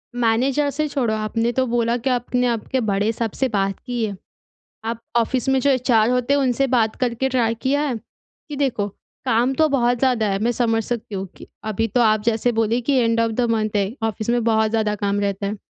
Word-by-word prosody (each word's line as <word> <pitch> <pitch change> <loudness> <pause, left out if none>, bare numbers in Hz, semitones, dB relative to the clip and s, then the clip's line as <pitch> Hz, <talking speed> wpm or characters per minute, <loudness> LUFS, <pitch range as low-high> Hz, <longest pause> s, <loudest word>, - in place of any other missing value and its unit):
Manager 250 +5 +1
से 305 +2 -1
छोड़ो 255 -6 -1
आपने 225 +2 -1
तो 260 +2 +1
बोला 235 0 +1
कि 250 +3 -2
आपने 250 0 0
आपके 240 +3 -1
बड़े 205 +3 +1
साहब 225 -2 -3
से 265 - +1
बात 195 -2 -1
की 245 -3 -2
है। 205 - -4 0.7
आप 230 0 -3 0.2
ऑफ़िस 250 +3 +1
में 265 - +3
जो 280 - +2
एचआर 245 -4 +3
होते 250 +2 +1
हैं 285 - +3
उनसे 265 +1 +1
बात 230 -4 +1
करके 250 +2 0
ट्राई 230 -3 +1
किया 280 +2 +1
है? 245 - -2
कि 290 +6 -14
देखो, 245 -7 0 0.4
काम 240 +4 +2
तो 315 +3 +3
बहुत 245 -3 +2
ज़्यादा 250 -5 +2
है 195 - 0
मैं 240 - +2
समझ 225 -1 +1
सकती 215 -2 -4
हूँ 190 0 -3
कि - - -12 0.2
अभी 225 +2 0
तो 245 +3 +1
आप 215 -2 +3
जैसे 230 +1 +1
बोले 225 +1 +1
कि 280 +4 0
एंड 230 -1 +2
ऑफ़ 230 0 +1
द 235 - -1
मंथ 215 -2 -1
है 200 +2 0
ऑफ़िस 220 0 -2
में 240 -1 +2
बहुत 220 -1 +2
ज़्यादा 215 -2 +1
काम 200 0 +1
रहता 200 0 -2
है। 210 - -3
235 Hz, 220 wpm, -21 LUFS, 220-255 Hz, 0.7 s, में